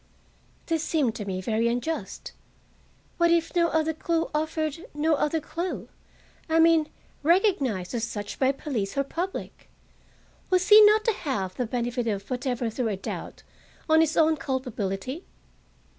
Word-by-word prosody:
This 325 -2 -1
seemed 290 -8 +1
to 210 - -5
me 185 -1 -3
very 225 +3 0
unjust. 245 +8 -3 0.9
What 340 -1 +4
if 335 0 +1
no 340 -1 +4
other 320 -1 +1
clue 330 +1 -1
offered—no 315 - -1
other 300 +2 +1
clue, 340 +4 -5 0.6
I 320 - +3
mean, 325 -2 +5 0.3
recognized 295 - +2
as 235 -2 -2
such 205 -3 -5
by 265 0 +4
police 250 -7 -4
or 275 - +3
public! 350 +7 -5 0.8
Was 370 0 +2
he 425 +1 +10
not 430 +1 +5
to 455 - +3
have 205 - -3
the 250 - -2
benefit 240 0 -2
of 200 -2 -2
whatever 245 -1 -1
threw 240 +1 -2
a 205 -3 -2
doubt - - -7 0.4
on 315 0 +5
his 320 0 +1
own 320 -1 +4
culpability? 255 - -3
295 Hz, 145 wpm, -26 LUFS, 235-330 Hz, 0.9 s, he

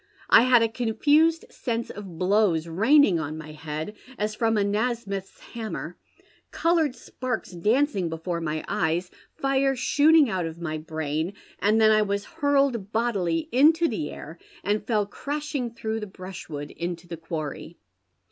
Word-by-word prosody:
1 235 - +7
had 245 -2 +6
a - - +3
confused 290 +9 +2
sense 235 -1 -3
of 195 -5 -9
blows 185 -3 +2
raining 210 - +4
on 155 0 -4
my 155 -1 -8
head, 155 +5 -5 0.2
as 210 +1 -1
from 225 0 +1
a 205 - +3
Nasmyth's 205 -2 -2
hammer, 225 -2 -5 0.5
coloured 325 -5 +1
sparks 245 -2 -5
dancing 205 - +1
before 170 +1 -3
my 155 -1 -3
eyes, 170 +2 0 0.2
fire 270 0 +1
shooting 295 +4 +5
out 185 -5 -1
of 165 +1 -8
my 155 -2 -3
brain, 155 +2 -3 0.3
and 210 +3 +3
tlien 220 0 +6
I 215 0 +5
was 200 -1 -1
hurled 280 - +1
bodily 195 -8 0
into'^he 290 - +3
air, 160 +3 -9 0.2
and 210 +2 0
fell 215 -3 +2
crashing 285 +3 -4
through 225 -1 -4
the 210 - -6
bmshwooii 180 -6 -8
into 170 0 -4
the 170 - -6
quarry. 160 0 -6
210 Hz, 145 wpm, -25 LUFS, 170-250 Hz, 0.5 s, 1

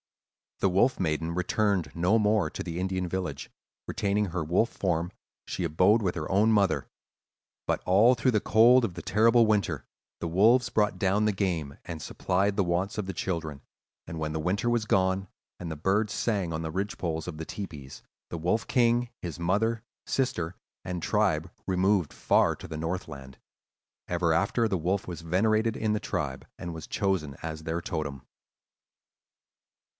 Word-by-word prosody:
"The 100 - +4
Wolf 120 +8 +2
Maiden 80 -1 -1
returned 90 -2 0
no 90 +6 +3
more 105 -5 +2
to - - -6
the 85 -1 -4
Indian 95 -1 -1
village; 90 -6 -4 0.4
retaining 105 -1 0
her 90 -2 -3
wolf 90 +9 +2
form, 85 -2 -1 0.4
she 90 - -3
abode 90 +8 +3
with 90 -2 +1
her 75 -3 -4
own 105 +4 +4
mother. 100 -3 +2 0.8
But - - 0
all 105 +7 +6
through 125 +1 +1
the 110 - +2
cold 120 +5 +5
of 95 - -4
the - - -6
terrible 115 +3 +4
winter, 100 - 0 0.3
the 85 - -3
wolves 115 +9 +4
brought 105 -4 +1
down 100 +3 +2
the 105 - +3
game, 85 -8 -2
and 85 -3 -6
supplied 95 +5 0
the 100 - +3
wants 90 +4 -1
of 105 - -2
the 95 - -3
children; 80 -7 -3 0.5
and 80 - -6
when 75 -1 -2
the 80 - -2
winter 100 +8 0
was 120 -2 +1
gone, 95 -1 +1 0.3
and 85 -2 -5
the - - -4
birds 100 +7 +1
sang 100 -7 -1
on 80 0 -3
the 80 - -3
ridgepoles 90 -4 -3
of 85 -3 -5
the 80 - -5
tepees, 75 -10 -8 0.3
the 85 - -4
Wolf 90 +7 0
King, 120 0 +2
his 85 -2 -6
mother, 105 +6 0 0.2
sister, 90 -10 -1 0.3
and 90 -1 -4
tribe - - +1 0.2
removed 95 -2 +2
far - - +2
to - - -10
the 80 - -6
north 85 +4 -3
land. 70 -4 -10 0.7
Ever 85 -2 +1
after, 100 +6 +2
the 95 -4 -1
wolf 95 +5 -1
was 85 -2 -6
venerated 110 +6 +1
in 110 -1 0
the 105 - 0
tribe - - -4
and 85 - -6
was 80 -1 -8
chosen 95 -9 -1
as 80 -1 -5
their 80 +2 -2
totem." 75 -6 -4
95 Hz, 175 wpm, -28 LUFS, 85-105 Hz, 0.8 s, all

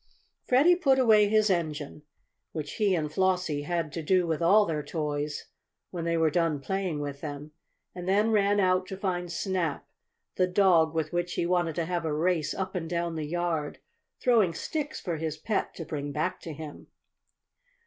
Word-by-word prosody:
Freddie 290 +8 +5
put 275 -7 +3
away 220 -5 +5
his 215 0 +3
engine, 155 -4 -2 0.5
which 150 -2 -5
he 205 -4 +2
and 155 -3 -2
Flossie 180 -5 +1
had 170 -2 -2
to 165 - -3
do 180 +3 +2
with 165 -1 -2
all 205 +5 +5
their 155 -4 -2
toys 150 -1 -3 0.5
when 170 -2 -4
they 170 0 +1
were 160 -1 +3
done 165 -3 +1
playing 185 0 -2
with 140 -1 -5
them, 145 0 -6 0.4
and 180 0 -5
then 210 +3 +3
ran 205 -1 +3
out 185 -1 +2
to 190 - -6
find 180 -3 -2
Snap, 175 -3 -2 0.5
the 185 - +3
dog 180 -4 +3
with 160 0 -1
which 175 0 -1
he - - 0
wanted 175 -2 +1
to 170 - -1
have 175 0 -2
a 160 -2 -1
race 165 -1 0
up 190 0 -3
and 165 -4 -4
down 170 -1 -1
the 155 -2 -4
yard, 165 -2 -2 0.4
throwing 220 -9 +3
sticks 300 -2 -3
for 170 -4 -3
his 155 -1 -3
pet 205 +6 -2
to 165 - -6
bring 145 -2 -4
back 150 +2 -2
to 165 - -7
him. 155 0 -9
170 Hz, 185 wpm, -28 LUFS, 155-190 Hz, 0.5 s, Freddie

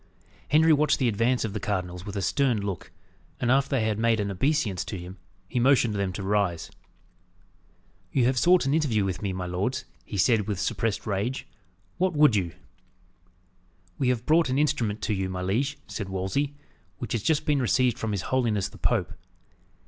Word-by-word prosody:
Henry 155 +2 +5
watched 150 0 +3
the 130 - +1
advance 115 +3 +1
of 105 - -4
the 105 - -3
cardinals 90 -3 -3
with 100 - -6
a 100 - -2
stern 130 -2 +1
look, 100 -4 -5 0.5
and 120 - +1
after 135 +1 +3
they 125 -5 +1
had 110 -1 -1
made 115 -1 +2
an 100 -1 -1
obeisance 105 - 0
to 100 - -6
him, 90 +1 -9 0.3
he 125 - -1
motioned 125 -3 +4
them 100 -2 -1
to 100 - -5
rise. 95 -4 0 1.4
"You 130 -3 +2
have 130 +2 +2
sought 175 +2 +4
an 135 - +1
interview 130 -11 +1
with 95 -1 -3
me, 100 -2 -2
my 95 -1 -4
lords," 90 +8 -2 0.2
he 100 - -6
said, 110 0 +3
with 100 -4 -2
suppressed 110 +1 -1
rage. 110 +6 -2 0.5
"What 185 0 +2
would 150 -6 +5
you?" 90 -5 -1 1.5
"We 130 - +2
have 125 -2 -1
brought 160 -1 +3
an 130 - 0
instrument 115 -8 0
to 110 - 0
you, 95 -1 -2
my 90 0 -4
liege," 135 +10 0
said 100 -3 -5
Wolsey, 95 +10 -2 0.4
"which 115 - -6
has 115 - 0
just 155 +5 +1
been 145 -2 +2
received 125 0 +2
from 110 - -2
his 100 -3 -2
holiness 115 -7 0
the - - -15
Pope." - - 0
110 Hz, 190 wpm, -26 LUFS, 100-135 Hz, 1.5 s, Henry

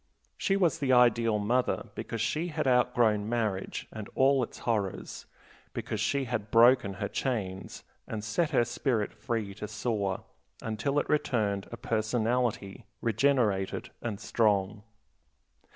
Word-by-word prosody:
She 195 - +1
was 175 -4 +2
the 135 -3 +1
ideal 120 -3 +4
mother 120 +5 0
because 115 - -4
she 155 +9 0
had 155 -3 -2
outgrown 120 -4 +3
marriage 110 -5 -2
and 110 -2 -7
all 135 0 +4
its 120 - -4
horrors, 105 -5 -3 0.5
because - - -4
she 140 -1 +1
had 115 -4 -3
broken 115 -3 +5
her - - -3
chains, 100 -8 -3 0.2
and 110 -2 -4
set 150 +10 0
her 120 - +3
spirit 120 -2 -1
free 110 -4 -3
to 105 +1 -6
soar 105 -3 -2 0.4
until 110 +6 -2
it - - +1
returned 110 -9 0
a 120 - -6
personality, 115 -2 -1
regenerated 115 -4 +1
and 110 -4 -4
strong. 105 -2 +1
115 Hz, 135 wpm, -29 LUFS, 105-125 Hz, 0.5 s, broken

